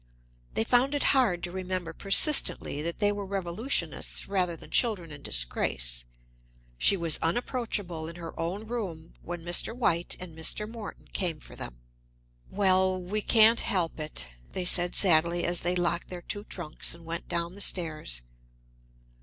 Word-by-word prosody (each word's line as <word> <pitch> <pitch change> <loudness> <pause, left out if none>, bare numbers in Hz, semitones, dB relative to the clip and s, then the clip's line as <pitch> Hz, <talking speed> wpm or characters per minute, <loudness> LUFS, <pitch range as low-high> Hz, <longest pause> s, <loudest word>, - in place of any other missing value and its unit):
They - - +2
found 250 +5 +2
it 285 - 0
hard 220 -11 +2
to 175 - -4
remember 185 -2 -4
persistently 195 - +5
that 170 +2 -4
they 205 -1 +2
were 205 0 -4
revolutionists 195 +6 -1
rather 185 -3 0
than - - -14
children 200 -9 +1
in 145 -1 -9
disgrace. - - 0 0.7
She 200 - +4
was 165 -3 +3
unapproachable 180 -4 -2
in 165 - -8
her 170 -2 -8
own 180 +6 -3
room 190 -9 -6
when 175 -1 -7
Mr. 175 +7 +3
White 175 -8 +1
and 180 -3 -8
Mr. 160 +6 -1
Morton 225 -2 -9
came 170 -5 -1
for - - -10
them. - - -9 0.7
"Well, 190 -1 +2
we 195 +4 -2
can't 225 +1 +6
help 175 -4 0
it," 150 - -3 0.3
they 185 - -2
said 175 0 +4
sadly 170 -1 +3
as 175 0 0
they 175 +1 -1
locked 175 -1 -1
their 180 -1 -7
two 205 +4 -5
trunks 170 -4 -4
and 170 -1 -15
went 165 +1 -5
down 170 0 -2
the 200 - -9
stairs. 155 - 0
175 Hz, 160 wpm, -28 LUFS, 165-205 Hz, 0.7 s, can't